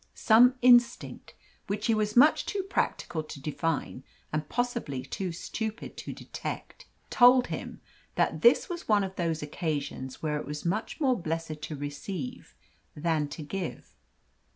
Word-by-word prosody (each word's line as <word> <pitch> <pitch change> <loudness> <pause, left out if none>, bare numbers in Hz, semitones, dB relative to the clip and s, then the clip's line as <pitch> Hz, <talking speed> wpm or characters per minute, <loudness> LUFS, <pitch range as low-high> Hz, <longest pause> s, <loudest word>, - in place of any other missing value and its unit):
Some 245 +3 +6
instinct, 245 -1 +3 0.3
which 205 +2 -2
he 230 - +3
was 215 +1 0
much 300 +5 +6
too 400 -2 -2
practical 175 - -1
to 155 -2 -9
define, 155 +3 -2 0.3
and 155 -1 -2
possibly 235 - -2
too 180 +7 -4
stupid 220 +6 -5
to - - -6
detect, - - -7 0.2
told 250 +1 +7
him - - -6 0.3
that - - +1
this 475 - +5
was 350 -2 -6
one 210 -2 +4
of 190 0 -5
those 165 -3 -1
occasions 145 -4 -4
where 150 -1 -1
it - - -9
is 150 +2 -5
much 210 - -2
more 260 - +2
blessed 160 -1 -4
to 150 +1 -5
receive 145 +1 -6 0.4
than 155 -1 0
to 150 +2 -7
give. 185 +4 -5
175 Hz, 150 wpm, -28 LUFS, 150-240 Hz, 0.4 s, told